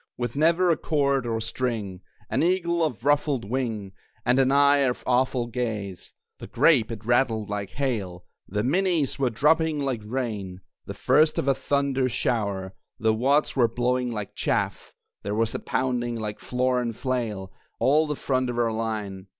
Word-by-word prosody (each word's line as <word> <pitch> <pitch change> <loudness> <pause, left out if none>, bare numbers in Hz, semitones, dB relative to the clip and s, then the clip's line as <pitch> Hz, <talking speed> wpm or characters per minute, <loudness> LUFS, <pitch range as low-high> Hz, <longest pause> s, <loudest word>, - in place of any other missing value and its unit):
With 120 0 -3
never 170 +4 +3
a 160 - +2
cord 140 -4 0
or 115 -1 -1
string, 110 -5 -3 0.3
An - - 0
eagle 170 -1 +1
of 130 -6 -3
ruffled 145 -4 +2
wing, 110 -5 -2 0.3
And 125 +2 +3
an 135 0 +3
eye 140 +1 +5
of 130 -3 0
awful 125 0 +1
gaze. 110 -6 -4 0.3
The - - -8
grape 130 -9 +3
it 110 -1 -7
rattled 115 -3 +1
like 100 -2 -3
hail, 105 -10 -3 0.2
The 105 +2 -2
minies 165 0 +1
were 135 -2 +2
dropping 155 +6 +2
like 135 -5 -2
rain, 105 -6 -4 0.3
The - - -6
first 155 0 +3
of - - -1
a 135 - +5
thunder 135 -1 0
shower; 100 -6 -1 0.2
The 110 0 +2
wads 135 +7 +2
were 125 -3 +4
blowing 125 +1 0
like 105 -3 -5
chaff - - -2 0.3
(There 105 - -3
was 115 0 0
pounding 120 -2 -1
like 105 -2 -4
floor 125 0 0
and 115 -2 -3
flail, 110 -7 -3 0.3
All 155 +4 +3
the 150 - -2
front 130 -2 -1
of 120 - -3
our 115 -1 +2
line!) 105 -4 -4
125 Hz, 165 wpm, -25 LUFS, 110-140 Hz, 0.3 s, eye